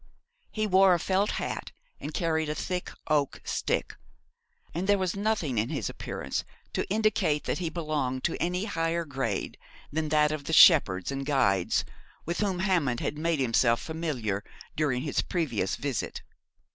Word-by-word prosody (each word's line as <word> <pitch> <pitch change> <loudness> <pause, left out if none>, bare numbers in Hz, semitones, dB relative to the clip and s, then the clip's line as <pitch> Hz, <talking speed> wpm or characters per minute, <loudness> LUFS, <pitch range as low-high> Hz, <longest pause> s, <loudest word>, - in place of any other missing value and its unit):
He 215 -1 -1
wore 190 -2 +5
a - - -1
felt 195 +4 +1
hat, - - -4 0.3
and 150 - -5
carried 160 -1 0
a 150 - -2
thick 180 +2 -3 0.2
oak 150 -3 +1
stick, - - -1 0.8
and 175 +4 -2
there 205 0 +5
was 185 -2 -1
nothing 200 - 0
in 110 - 0
his - - -2
appearance - - -4 0.3
to - - -2
indicate 205 -8 +1
that - - -2
he 170 -3 -1
belonged 150 -6 -2
to 170 - 0
any 180 +3 0
higher 165 -3 -1
grade 135 -8 -3 0.3
than 155 0 -1
that 150 0 +3
of 155 -2 -4
the 160 - -3
shepherds 105 - +6
and 135 0 -3
guides 100 -11 +2 0.4
with 170 +1 -2
whom 195 -3 0
Hammond 165 - +1
had 150 - -3
made 165 -1 0
himself 115 -2 +3
familiar 130 -12 -3 0.3
during 140 -5 0
his 145 - 0
previous 125 - -1
visit. 140 -4 -3
155 Hz, 160 wpm, -28 LUFS, 135-180 Hz, 0.8 s, shepherds